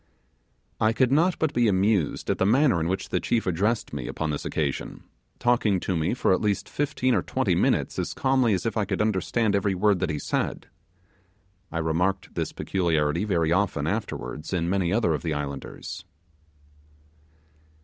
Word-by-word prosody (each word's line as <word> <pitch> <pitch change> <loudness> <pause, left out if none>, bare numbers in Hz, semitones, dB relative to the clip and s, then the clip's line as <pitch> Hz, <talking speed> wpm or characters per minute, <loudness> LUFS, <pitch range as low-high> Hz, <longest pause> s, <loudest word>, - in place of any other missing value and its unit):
I 110 +1 +3
could 125 +1 +2
not 170 +6 +3
but 155 -2 0
be 120 -1 +3
amused 95 -3 +1
at - - -2
the - - +3
manner 125 - +4
in 80 - -1
which 95 +2 -2
the - - 0
chief 115 - 0
addressed 100 +5 0
me 65 -4 -4
upon 80 -1 -2
this 75 - -4
occasion, 75 -4 -3 0.3
talking 115 -5 +2
to 95 - -1
me 80 +7 0
for 110 - +2
at - - +1
least 105 -2 0
fifteen 140 -3 0
or 100 - +2
twenty - - 0
minutes - - +1
as - - -3
calmly 130 -5 +2
as 90 - -4
if 115 - -1
I 105 - +1
could - - -2
understand 110 +1 +1
every 100 -1 +1
word 100 0 +2
that 90 -3 -1
he 75 - -1
said. - - -2 1.1
I - - -3
remarked 85 +4 -1
this - - -2
peculiarity 85 -1 0
very 85 -6 +1
often 100 +2 +1
afterwards 60 +8 -4
in 85 -1 0
many 95 -3 +1
other 105 -6 +2
of 75 - -2
the 80 -3 -2
islanders. 70 -2 -6
95 Hz, 180 wpm, -26 LUFS, 80-110 Hz, 1.1 s, manner